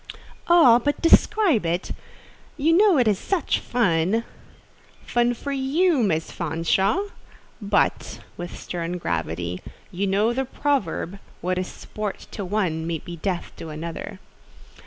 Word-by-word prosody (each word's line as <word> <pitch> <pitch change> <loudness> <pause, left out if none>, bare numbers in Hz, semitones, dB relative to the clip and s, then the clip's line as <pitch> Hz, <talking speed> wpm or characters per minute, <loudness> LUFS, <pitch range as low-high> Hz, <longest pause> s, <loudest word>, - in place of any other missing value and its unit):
"Oh, 295 -9 +7
but 290 - 0
describe 335 - +4
it—you 185 - -3
know 390 -1 +5
it 245 -3 +3
is 205 -3 +2
such 380 -6 0
fun!" 200 -1 +1 0.8
"Fun 240 0 +1
for 280 +4 -5
you, 280 +3 +2
Miss 165 -7 0
Fanshawe? 190 - 0 0.5
but" 200 - 0 0.2
(with 175 0 -7
stern 175 0 -4
gravity) 85 - -3 0.3
"you 195 +2 -1
know 205 +5 +2
the 265 +2 -1
proverb—'What 195 - -2
is 185 - -3
sport 210 -2 -6
to 205 - -5
one 180 -5 -1
may 170 -1 -1
be 170 +3 -9
death 180 +1 -3
to 165 - -7
another. 165 +5 -6
200 Hz, 125 wpm, -24 LUFS, 170-265 Hz, 0.8 s, Oh